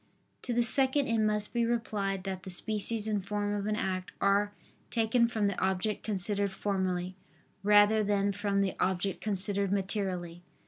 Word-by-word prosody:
To 250 - -5
the 240 - +3
second, 265 +4 +3
it 230 -2 0
must 210 0 0
be 235 -1 +1
replied 205 -5 -1
that 190 -1 -4
the 190 - -9
species 215 +3 -1
and 210 -3 -1
form 205 +1 -2
of 205 0 -2
an 215 - 0
act 185 -3 -3
are 200 +1 +2 0.4
taken 235 +1 +2
from 220 -3 -1
the 200 -2 -1
object 190 +2 0
considered 200 -1 0
formally, 185 -2 -2 0.5
rather 210 +1 +5
than 200 -1 +1
from 200 0 0
the 195 -1 0
object 185 +1 -1
considered 200 -1 0
materially. 190 -3 -1
205 Hz, 165 wpm, -30 LUFS, 190-215 Hz, 0.5 s, rather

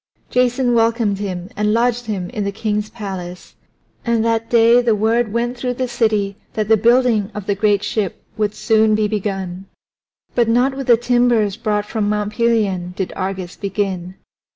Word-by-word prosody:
Jason 250 0 +2
welcomed 225 -3 +1
him 185 -3 -4
and 210 +1 +1
lodged 240 0 +1
him 190 -5 -3
in 210 - -3
the 200 - -2
king's 210 0 -2
palace, 190 -5 -7 0.5
and 230 -1 +1
that 230 0 0
day 235 +1 +5
the 235 -3 +2
word 220 +1 +1
went 240 +2 -1
through 245 0 -3
the 255 +1 -2
city 215 -4 0 0.2
that 215 -2 -1
the 220 - +5
building 230 -2 +3
of 210 -2 -5
the 200 - +1
great 205 0 +1
ship 205 -5 -2
would 210 -1 -1
soon 220 -1 +3
be 215 0 +1
begun. 195 -3 -4 0.7
But 235 -2 +2
not 250 +4 +2
with 270 -1 -5
the 240 -2 +6
timbers 240 -4 +2
brought 210 -2 -1
from 210 -1 -2
Mount 210 0 -1
Pelion 205 -7 0
did 190 - -3
Argus 190 -1 -4
begin. 190 -2 -3
215 Hz, 175 wpm, -19 LUFS, 200-235 Hz, 0.7 s, the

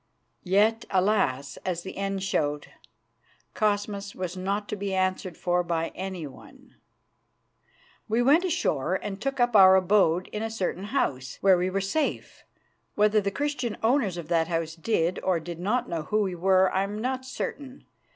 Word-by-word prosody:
Yet, 210 +4 +2
alas! 180 -9 +1
as 175 -2 -4
the 190 - -7
end 195 -1 -2
showed, 150 -6 -1 0.8
Cosmas 205 -1 -1
was 185 -1 -4
not 200 +3 -2
to - - -2
be 200 -1 -3
answered 185 -1 -1
for 180 0 +1
by 165 -1 -1
anyone. 190 - -8 1.4
We 230 +3 +2
went 295 +8 +5
ashore 190 - 0
and 195 +1 -5
took 275 +1 -2
up 240 -2 +2
our 190 -2 +8
abode 185 -2 +3
in 210 - -5
a 225 - -2
certain 195 -3 -3
house, 130 - -2
where 195 -1 +6
we 180 +1 0
were 195 +1 -1
safe. 285 +11 -2 0.5
Whether 210 0 +3
the 200 - -1
Christian 255 -2 -2
owners 225 -6 +2
of 170 - -6
that 165 -1 +2
house 165 -1 -2
did 170 0 0
or 185 -3 +1
did 170 +1 -7
not 215 +7 0
know 165 -2 -3
who 210 +7 0
we 190 -2 -2
were, 185 +1 +3
I 190 - +2
am 205 +2 -3
not 260 +3 -2
certain. 260 +1 -6
195 Hz, 165 wpm, -26 LUFS, 175-215 Hz, 1.4 s, our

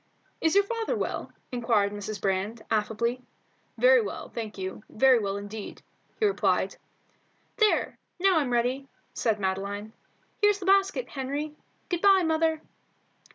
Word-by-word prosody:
"Is 320 +2 +2
your 400 - +6
father 455 +2 -2
well?" - - -3 0.2
inquired 230 -5 +1
Mrs. 205 +1 -5
Brand, 200 +4 -1
affably. 225 +3 0 0.6
"Very - - +6
well, 430 - -5
thank 220 -3 -6
you, 190 +2 -5
very 260 +1 +5
well 200 -2 -2
indeed," 205 +1 -8 0.4
he 440 - +3
replied 405 - +1 0.8
"There; 430 -1 +2 0.2
now 375 -2 +4
I'm 280 -4 -1
ready," 250 +3 0 0.3
said 220 -2 0
Madeline. 200 +2 -3 0.5
"Here's 415 -1 +5
the 390 - -7
basket, 390 +4 +3
Henry. 285 +3 -4 0.3
Good 350 -2 -2
bye, 390 -2 +6
mother." 320 0 +1
250 Hz, 135 wpm, -27 LUFS, -, 0.8 s, your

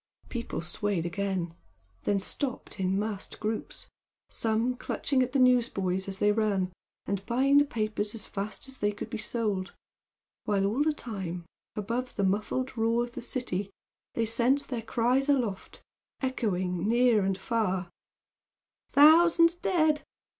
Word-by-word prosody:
The - - -23
people 235 -7 -4
swayed 180 0 -1
again 185 -2 -2 0.5
then 205 - +2
stopped 235 +3 -3
in 190 0 +1
massed 205 -1 -4
groups, 220 +1 -4 0.4
some 225 +3 0
clutching 260 +1 -1
at 255 0 0
the 275 - +1
newsboys 230 -8 +2
as 195 -1 -2
they 205 +1 +3
ran 200 -4 0 0.3
and 195 0 -2
buying 270 +4 +4
the 290 - +4
papers 215 -4 -2
as 225 - -6
fast 205 +6 -5
as 265 0 -6
they 205 0 +1
could 205 - -7
be 225 - -3
sold, 215 -4 -2 0.7
while 200 -2 +2
all 220 +8 +1
the 310 +1 +3
time 190 - -5 0.3
above 235 +5 -3
the 200 - 0
muffled 215 +7 0
roar 230 +1 +2
of 240 - -6
the 250 - -7
city 230 -6 -3 0.5
they 230 - +1
sent 240 +5 +1
their 245 -3 -2
cries 245 +5 +1
aloft, 240 -9 -1 0.4
echoing 190 -8 -1
near 235 -3 +4
and 190 -1 0
far 190 -5 -1 1.0
"Thousands 335 +3 +7
dead! 315 -4 +2
220 Hz, 145 wpm, -29 LUFS, 195-255 Hz, 1.0 s, Thousands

